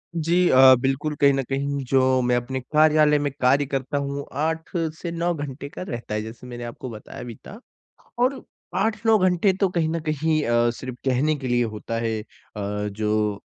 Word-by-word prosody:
जी, 170 +2 +2
अ, 130 0 +8
बिल्कुल 135 +3 -1
कहीं 140 -1 +6
ना 135 - 0
कहीं 140 0 -2
जो 130 0 +3
मैं 125 0 +2
अपने 125 +2 -2
कार्यालय 150 -1 +5
में 145 -1 -1
कार्य 135 +3 +4
करता 135 +1 -2
हूँ, 140 0 -3
8 160 +2 -2 0.3
से 170 - -4
9 170 +1 0
घंटे 140 -2 -6
का - - -9
रहता 120 -9 -5
है, 105 - -1
जैसे 115 +3 -9
मैंने 120 -1 -7
आपको 120 +2 -7
बताया 110 +1 -9
भी 120 -2 -8
था, 210 - -10 0.6
और 260 +2 +1 0.3
8-9 220 0 +2
घंटे 185 +1 +3
तो 195 - +4
कहीं 165 -3 0
ना 165 0 -1
कहीं 155 +1 +1
अ, 120 0 +3
सिर्फ़ 130 +1 -7
कहने 135 +4 +2
के 135 -3 -5
लिए 120 0 +2
होता 115 +2 -4
है, 110 -1 -1
अ, 105 -1 -6
जो 105 -1 -1
135 Hz, 190 wpm, -23 LUFS, 120-155 Hz, 0.6 s, अ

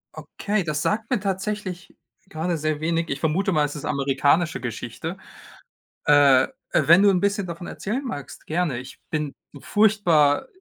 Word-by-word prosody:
Okay, 210 -1 -2
das 150 -2 -2
sagt 210 +6 -1
mir 250 - +1
tatsächlich 195 -1 -4 0.3
grade 170 0 -2
sehr 155 -1 -1
wenig. 165 +1 -1
Ich 140 - -2
vermute 170 +6 0
mal, 155 -4 +2
es 145 - -6
ist 150 - -6
'ne - - -3
amerikanische 140 +2 +1
Geschichte. 120 -4 -5 0.9
Äh, 140 -3 +5 0.3
wenn 170 +4 +6
du 205 - +6
'n 185 -2 +2
bisschen 200 -1 0
davon 170 +1 -7
erzählen 240 +8 -4
magst, 145 - -7
gerne. 160 -5 -1
Ich 125 +1 -9
bin 150 -2 -2 0.3
furchtbar 200 - +3
170 Hz, 160 wpm, -23 LUFS, 145-200 Hz, 0.9 s, wenn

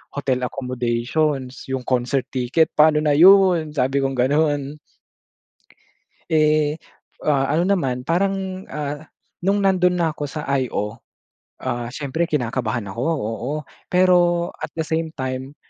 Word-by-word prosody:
hotel 130 -3 -1
accommodations, 130 +2 -2
'yong 130 -1 -2
concert 130 +1 0
ticket 130 +6 +2
paano 150 0 +5
na 150 - +3
'yon?" 180 -4 +6
Sabi 135 0 +1
kong 135 0 -1
gano'n. 145 +2 +1 1.5
Eh, 155 -1 +2 0.5
ah, 140 -2 +2
ano 170 - +2
naman 125 -7 -2
parang, 190 +1 -1
ah, 150 0 -4 0.4
nung 195 +3 +2
nandun 180 -2 +3
na 165 -3 0
ako 145 -1 -5
sa 150 +1 -5 0.2
IO, 110 -2 -3 0.6
ah 120 -2 -2
siyempre 145 +5 -2
kinakabahan 120 -5 -1
ako 115 +5 -5
oo. 115 +2 -3 0.4
Pero 175 -1 +3
at - - -4
the 160 - 0
same 160 0 -1
time, 130 +1 -5
145 Hz, 125 wpm, -21 LUFS, 130-165 Hz, 1.5 s, yon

